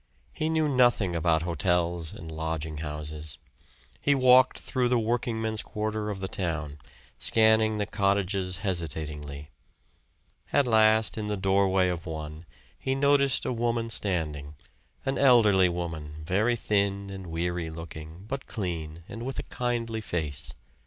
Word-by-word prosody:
He 155 Hz, -, -1 dB
knew 160 Hz, -1 st, +2 dB
nothing 120 Hz, -9 st, +3 dB
about 80 Hz, -1 st, +2 dB
hotels 85 Hz, 0 st, 0 dB
and 80 Hz, 0 st, -9 dB
lodging 80 Hz, -1 st, -3 dB
houses 75 Hz, -1 st, -5 dB, 0.6 s
he 145 Hz, -, +3 dB
walked 130 Hz, -1 st, +6 dB
through 125 Hz, -2 st, -1 dB
the 125 Hz, -, +3 dB
workingmen's 110 Hz, -1 st, -1 dB
quarter 105 Hz, 0 st, -3 dB
of 100 Hz, -2 st, -5 dB
the 95 Hz, -, -2 dB
town, 80 Hz, -6 st, -3 dB, 0.4 s
scanning 110 Hz, -1 st, +4 dB
the 105 Hz, -, 0 dB
cottages 100 Hz, -2 st, 0 dB
hesitatingly. 75 Hz, -4 st, -4 dB, 1.0 s
At 145 Hz, -, +4 dB
last 110 Hz, -1 st, +4 dB
in 105 Hz, -, -3 dB
the 105 Hz, -1 st, -1 dB
doorway 95 Hz, -1 st, +3 dB
of 90 Hz, 0 st, -3 dB
one 80 Hz, +1 st, -6 dB, 0.3 s
he 130 Hz, -, -1 dB
noticed 140 Hz, -1 st, +3 dB
a -, -, 0 dB
woman 115 Hz, -1 st, -1 dB
standing, 75 Hz, -8 st, -1 dB, 0.5 s
an 135 Hz, 0 st, -1 dB
elderly 105 Hz, -9 st, +6 dB
woman, 80 Hz, -4 st, -5 dB
very 105 Hz, +8 st, +2 dB
thin 100 Hz, -2 st, 0 dB
and 95 Hz, -2 st, -7 dB
weary 85 Hz, 0 st, -2 dB
looking, 80 Hz, +2 st, -9 dB
but 135 Hz, +3 st, -5 dB
clean, 85 Hz, -6 st, -4 dB
and 115 Hz, +2 st, -7 dB
with 130 Hz, +1 st, -4 dB
a -, -, -2 dB
kindly 115 Hz, -2 st, -2 dB
face. 75 Hz, -7 st, -4 dB
95 Hz, 140 wpm, -27 LUFS, 80-115 Hz, 1.0 s, walked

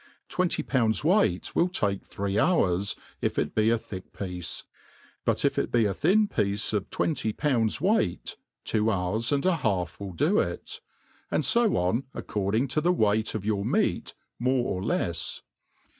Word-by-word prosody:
Twenty 185 Hz, -1 st, 0 dB
pounds 115 Hz, -2 st, +1 dB
weight 155 Hz, -, +2 dB
will 175 Hz, -, +3 dB
take 100 Hz, -, 0 dB
three 100 Hz, +1 st, -2 dB
'hours, 100 Hz, -, +2 dB, 0.3 s
if -, -, -1 dB
it -, -, 0 dB
be 110 Hz, +1 st, +3 dB
a 115 Hz, -, +3 dB
thick 95 Hz, -4 st, -9 dB
piece} 90 Hz, -3 st, -4 dB, 0.6 s
but -, -, +1 dB
if -, -, +2 dB
it -, -, -2 dB
be 115 Hz, -2 st, +3 dB
a 100 Hz, -, +1 dB
thin 200 Hz, -, +3 dB
piece 105 Hz, -, 0 dB
of 105 Hz, -2 st, -1 dB
twenty 145 Hz, -9 st, -1 dB
poyinds 115 Hz, -6 st, +1 dB
weight, 185 Hz, -, 0 dB, 0.3 s
two 110 Hz, +1 st, +1 dB
hours 105 Hz, +4 st, 0 dB
and 140 Hz, +2 st, +1 dB
an 180 Hz, -3 st, +2 dB
half 90 Hz, -, -1 dB
will 100 Hz, -2 st, -6 dB
do 165 Hz, -, +2 dB
it; -, -, -3 dB, 0.5 s
and -, -, 0 dB
fo 235 Hz, -3 st, +3 dB
on 95 Hz, +10 st, 0 dB
according 105 Hz, +6 st, -1 dB
to 150 Hz, +4 st, +1 dB
the 175 Hz, +3 st, +3 dB
weight 110 Hz, -8 st, +1 dB
of 105 Hz, -2 st, -4 dB
your 105 Hz, -2 st, 0 dB
meat, -, -, 0 dB, 0.2 s
more 125 Hz, 0 st, +1 dB
or 90 Hz, -, -4 dB
lefs. 85 Hz, -5 st, -1 dB
110 Hz, 170 wpm, -27 LUFS, 100-150 Hz, 0.6 s, will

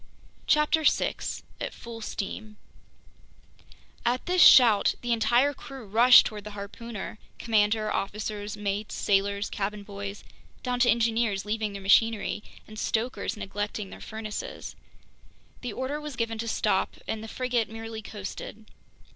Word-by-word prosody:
CHAPTER 300 Hz, +1 st, +3 dB
6 -, -, 0 dB, 0.2 s
At -, -, -4 dB
Full 230 Hz, -1 st, -9 dB
Steam 215 Hz, 0 st, -5 dB, 1.5 s
AT 245 Hz, +2 st, 0 dB
THIS 360 Hz, 0 st, +2 dB
SHOUT 230 Hz, -9 st, +8 dB
the 240 Hz, -1 st, 0 dB
entire 240 Hz, +5 st, +3 dB
crew 270 Hz, -4 st, -10 dB
rushed 235 Hz, +5 st, +7 dB
toward 210 Hz, -1 st, -5 dB
the 210 Hz, 0 st, -8 dB
harpooner—commander, 215 Hz, 0 st, -2 dB
officers, 210 Hz, +1 st, -3 dB
mates, 205 Hz, +1 st, -3 dB
sailors, 200 Hz, +1 st, +1 dB
cabin 205 Hz, +1 st, -3 dB
boys, 200 Hz, 0 st, -7 dB, 0.4 s
down 250 Hz, -1 st, -1 dB
to 245 Hz, 0 st, +4 dB
engineers 225 Hz, -3 st, +1 dB
leaving 215 Hz, -1 st, -2 dB
their 200 Hz, -1 st, -7 dB
machinery 215 Hz, +2 st, +3 dB, 0.3 s
and 215 Hz, 0 st, -9 dB
stokers 230 Hz, +1 st, -1 dB
neglecting 205 Hz, 0 st, -4 dB
their -, -, -10 dB
furnaces. 220 Hz, -, -6 dB, 0.9 s
The 245 Hz, -4 st, -4 dB
order 270 Hz, +5 st, -3 dB
was 300 Hz, -3 st, -6 dB
given 230 Hz, -1 st, -2 dB
to 230 Hz, -, -3 dB
stop, -, -, 0 dB
and 220 Hz, 0 st, -3 dB
the -, -, -7 dB
frigate 245 Hz, -1 st, -1 dB
merely 225 Hz, 0 st, -7 dB
coasted. 210 Hz, +1 st, -8 dB
220 Hz, 130 wpm, -27 LUFS, 205-235 Hz, 1.5 s, SHOUT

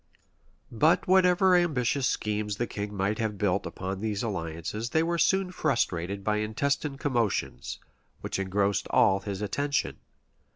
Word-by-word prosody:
} -, -, -40 dB, 0.3 s
But 155 Hz, +10 st, +3 dB
whatever 185 Hz, 0 st, +5 dB
ambitious 140 Hz, -6 st, +1 dB
schemes 105 Hz, -1 st, -1 dB
the 120 Hz, -, 0 dB
king 105 Hz, -2 st, -5 dB
might 100 Hz, +2 st, 0 dB
have 110 Hz, -2 st, -2 dB
built 100 Hz, -1 st, 0 dB
on 95 Hz, +1 st, -4 dB
these 105 Hz, -1 st, -2 dB
alliances, 95 Hz, +2 st, -4 dB
they 160 Hz, +6 st, +2 dB
were 170 Hz, 0 st, -1 dB
soon 185 Hz, +2 st, +2 dB
frustrated 100 Hz, -, -1 dB
by 105 Hz, +1 st, +1 dB
intestine 135 Hz, +7 st, -1 dB
commotions, 120 Hz, -7 st, -1 dB, 0.4 s
which -, -, -3 dB
engrossed 100 Hz, +1 st, 0 dB
all 95 Hz, 0 st, +4 dB
his 100 Hz, 0 st, -5 dB
attention. 140 Hz, +7 st, -1 dB
110 Hz, 140 wpm, -28 LUFS, 100-145 Hz, 0.4 s, whatever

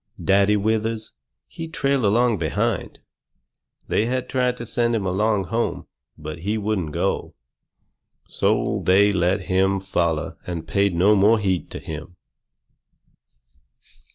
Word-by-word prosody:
Daddy 100 Hz, +2 st, +4 dB
Withers, 110 Hz, +1 st, -1 dB, 0.4 s
he 165 Hz, -, -7 dB
trailed 140 Hz, -6 st, 0 dB
along 115 Hz, +1 st, +2 dB
behind. 80 Hz, -3 st, -2 dB, 0.9 s
They 110 Hz, -, +1 dB
had 130 Hz, +1 st, -2 dB
tried 125 Hz, -1 st, 0 dB
to 120 Hz, -, -6 dB
send 120 Hz, 0 st, 0 dB
him 105 Hz, -3 st, -1 dB
along 100 Hz, +2 st, +1 dB
home, 115 Hz, +7 st, -2 dB, 0.3 s
but 75 Hz, +2 st, -7 dB
he 105 Hz, +6 st, -2 dB
wouldn't 100 Hz, -7 st, -2 dB
go. -, -, -2 dB, 0.9 s
So -, -, 0 dB
they 100 Hz, +2 st, +4 dB
let 95 Hz, +2 st, +1 dB
him 95 Hz, +1 st, +1 dB
foller 85 Hz, -6 st, -1 dB
and 85 Hz, -2 st, -5 dB
paid 100 Hz, -1 st, +1 dB
no 100 Hz, +5 st, +4 dB
more 105 Hz, +3 st, +5 dB
heed 95 Hz, -4 st, -1 dB
to -, -, -6 dB
him. 80 Hz, +3 st, -8 dB
100 Hz, 125 wpm, -22 LUFS, 90-110 Hz, 0.9 s, more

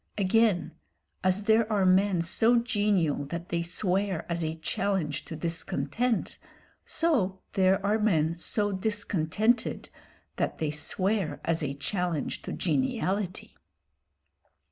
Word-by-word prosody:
Again, 210 Hz, -1 st, +2 dB, 0.5 s
as 185 Hz, +2 st, +2 dB
there 220 Hz, +1 st, +3 dB
are 200 Hz, -3 st, +2 dB
men 185 Hz, -1 st, +3 dB
so 225 Hz, +8 st, +4 dB
genial 205 Hz, -, +1 dB
that 170 Hz, +4 st, -6 dB
they 170 Hz, 0 st, 0 dB
swear 185 Hz, +1 st, -1 dB
as 170 Hz, -1 st, -2 dB
a 160 Hz, 0 st, -2 dB
challenge 165 Hz, -3 st, -2 dB
to 160 Hz, -, -7 dB
discontent, 170 Hz, +8 st, -2 dB, 0.4 s
so 210 Hz, -, 0 dB
there 190 Hz, +1 st, +3 dB
are 210 Hz, +2 st, +2 dB
men 165 Hz, -7 st, +2 dB
so 205 Hz, +4 st, 0 dB
discontented 205 Hz, +2 st, 0 dB, 0.5 s
that -, -, -1 dB
they 155 Hz, -2 st, -1 dB
swear 190 Hz, +5 st, -1 dB
as 165 Hz, 0 st, 0 dB
a 140 Hz, -2 st, -2 dB
challenge 175 Hz, +1 st, -2 dB
to -, -, -6 dB
geniality. 200 Hz, -2 st, -1 dB
190 Hz, 120 wpm, -28 LUFS, 170-210 Hz, 0.5 s, so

